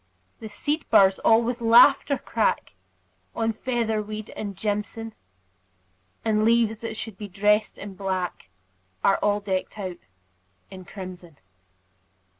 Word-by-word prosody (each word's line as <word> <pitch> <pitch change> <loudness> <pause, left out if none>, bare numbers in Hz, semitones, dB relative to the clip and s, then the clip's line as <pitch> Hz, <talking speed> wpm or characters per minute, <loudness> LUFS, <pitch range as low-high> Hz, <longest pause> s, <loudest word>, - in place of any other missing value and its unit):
The 220 - -8
seed 295 +8 -2
burrs 190 -1 +5
all 225 +1 +4
with 240 +1 -3
laughter 270 +5 +6
crack 225 - -1 0.6
On 225 0 0
featherweed 215 -3 -3
and 200 -2 -6
jimson; 210 +2 -3 1.1
And 215 -1 +2
leaves 225 -1 +2
that 225 -1 -5
should 220 -4 -7
be 210 - -6
dressed 210 +2 +1
in 200 -1 -8
black 185 - -4 0.5
Are 195 - +4
all 205 0 +2
decked 190 0 -3
out 185 -4 -5 0.7
in 185 -1 -10
crimson. 180 -4 -10
215 Hz, 120 wpm, -25 LUFS, 195-225 Hz, 1.1 s, laughter